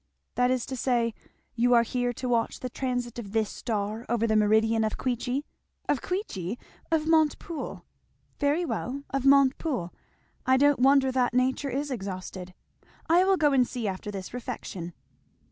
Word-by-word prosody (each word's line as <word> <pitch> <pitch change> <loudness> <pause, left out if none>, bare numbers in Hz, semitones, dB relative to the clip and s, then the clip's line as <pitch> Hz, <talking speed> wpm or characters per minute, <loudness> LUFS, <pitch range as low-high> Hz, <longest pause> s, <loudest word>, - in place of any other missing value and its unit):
"That 250 0 +2
is 255 -2 0
to 265 - -5
say, 235 -2 +1 0.4
you 245 +1 +3
are 235 - +6
here 245 +1 -1
to 250 +2 -5
watch 235 -2 0
the 255 - -4
transit 245 -2 -3
of 200 -3 -8
this 220 -2 +1
star 215 0 -3
over 235 -1 +1
the 220 -1 +1
meridian 220 +1 +3
of 215 - -1
Queechy?" 255 +2 -1 0.4
"Of 275 - +1
Queechy! 235 - -3 0.3
of 315 -1 +2
Montepoole." 320 0 0 0.5
"Very 295 +4 +2
well 280 -3 -3
of 275 0 0
Montepoole. 275 - +3 0.5
I 260 0 +4
don't 285 -1 +4
wonder 270 0 +5
that 250 -1 +1
nature 260 +2 +1
is 280 +3 -2
exhausted. 185 -4 -6 0.5
I 345 +3 +5
will 385 0 +3
go 295 -4 +3
and 255 -3 +4
see 240 -4 -3
after 195 +2 -4
this 195 0 -6
refection." 215 -8 -6
245 Hz, 160 wpm, -27 LUFS, 220-275 Hz, 0.5 s, are